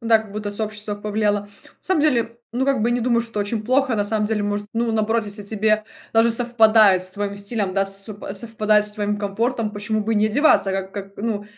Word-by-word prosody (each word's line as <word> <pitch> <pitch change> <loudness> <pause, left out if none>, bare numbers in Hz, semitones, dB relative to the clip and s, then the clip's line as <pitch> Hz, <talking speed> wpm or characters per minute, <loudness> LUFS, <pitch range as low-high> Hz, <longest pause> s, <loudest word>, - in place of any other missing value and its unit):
да, 230 -1 +4
как 215 -2 -10
будто 210 -1 -4
сообщество 210 0 -2
повлияло. 205 0 -1
На 205 - -16 0.3
самом 375 -5 +1
деле, 235 -6 +1
ну, 250 +2 0
как 275 -5 +1
бы 235 - +2
я 240 - +1
не 245 - -1
думаю, 235 0 +2
что 230 0 -6
это 210 - -2
очень 210 +2 -2
плохо. 255 +1 +2
На 205 - +1
самом 210 0 0
деле, 210 -1 -1
может, 205 0 -2
ну, 230 0 -1
наоборот, 220 +1 0
если 205 0 -6
тебе 215 +1 0 0.3
даже 225 +1 +4
совпадает 220 -5 +5
с 185 - -4
твоим 200 +1 -4
стилем 200 -2 -2
да, 195 0 +2
с 195 +1 0 0.3
совпадает 215 -1 +1
с 210 - -1
твоим 210 0 -2
комфортом, 220 +2 -2
почему 215 +1 -2
бы 225 +2 -1
и - - 0
не 210 - +3
одеваться, 215 -4 +3
как 190 0 -4
как, 195 -1 -7
ну, 210 -1 -3
215 Hz, 235 wpm, -21 LUFS, 205-230 Hz, 0.3 s, совпадает